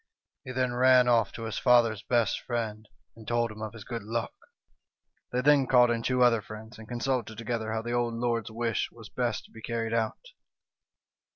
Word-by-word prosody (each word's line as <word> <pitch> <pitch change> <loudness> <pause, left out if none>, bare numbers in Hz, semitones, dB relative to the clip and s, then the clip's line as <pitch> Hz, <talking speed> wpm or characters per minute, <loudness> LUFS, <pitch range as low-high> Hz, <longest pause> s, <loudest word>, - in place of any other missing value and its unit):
He 130 - -7
then 130 -1 0
ran 125 0 +5
off 115 -4 +3
to 115 - -7
his 110 -1 -3
father's 120 -4 +4
best 120 -4 +1
friend, 110 -3 -4 0.3
and 110 -1 -14
told 120 -1 +1
him 110 0 -10
of 110 0 -5
his 110 -3 -10
good 115 0 -5
luck. 115 +2 -3 1.0
They 125 - 0
then 140 -1 +4
called 125 -2 +5
in 115 -1 -1
two 125 +1 +2
other 115 -3 +4
friends, 110 +1 -11
and 110 - -11
consulted 120 -2 -2
together 115 -1 -3
how 110 0 -2
the 120 - -4
old 120 -1 0
lord's 115 -1 -1
wish 115 +1 -1
was 110 -3 -13
best 120 -3 -2
to - - -20
be 115 - -12
carried 115 0 -3
out. 115 - -2
115 Hz, 195 wpm, -28 LUFS, 110-125 Hz, 1.0 s, ran